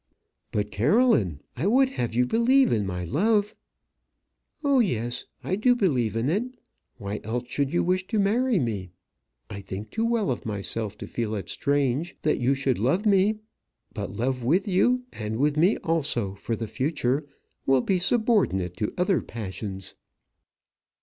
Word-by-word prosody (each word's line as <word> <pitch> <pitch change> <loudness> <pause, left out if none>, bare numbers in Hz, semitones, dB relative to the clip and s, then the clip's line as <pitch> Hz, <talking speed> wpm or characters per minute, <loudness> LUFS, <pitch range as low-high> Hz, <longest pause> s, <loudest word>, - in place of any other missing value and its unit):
"But, 105 0 -1
Caroline, 115 - +2
I 150 +10 -1
would 260 +5 +4
have 120 - -3
you 125 +1 +3
believe 250 - +3
in 105 -4 0
my 90 -1 -3
love." 205 - +1 1.1
"Oh, 280 -2 +4
yes; 120 - -1 0.2
I 185 - 0
do 245 +5 +3
believe 130 - +1
in 115 +3 0
it. 200 +10 +1 0.5
Why 100 +1 -4
else 115 +3 -2
should 140 +2 -1
you 175 - +1
wish 185 +1 0
to 225 - -1
marry 225 +4 +2
me? 105 - -2 0.6
I 100 - -7
think 100 +2 -7
too 225 - -1
well 230 - +1
of 120 - -4
myself 105 0 -3
to - - -7
feel 110 -2 -3
it 95 -4 -5
strange 140 +3 0
that 150 - +1
you 130 +3 +2
should 135 -3 0
love 145 - +1
me. 210 +1 +3 0.5
But - - -4
love 125 +1 -2
with 175 - +2
you, 245 +7 +2
and 110 0 -4
with 145 +3 +2
me 175 +7 +3
also 140 -11 0
for 115 +3 -3
the 115 - -4
future, 140 +3 -1 0.4
will 135 -1 +4
be 185 +7 +1
subordinate 190 - +1
to 105 - -2
other 185 0 +2
passions." 95 -3 -6
140 Hz, 165 wpm, -26 LUFS, -, 1.1 s, would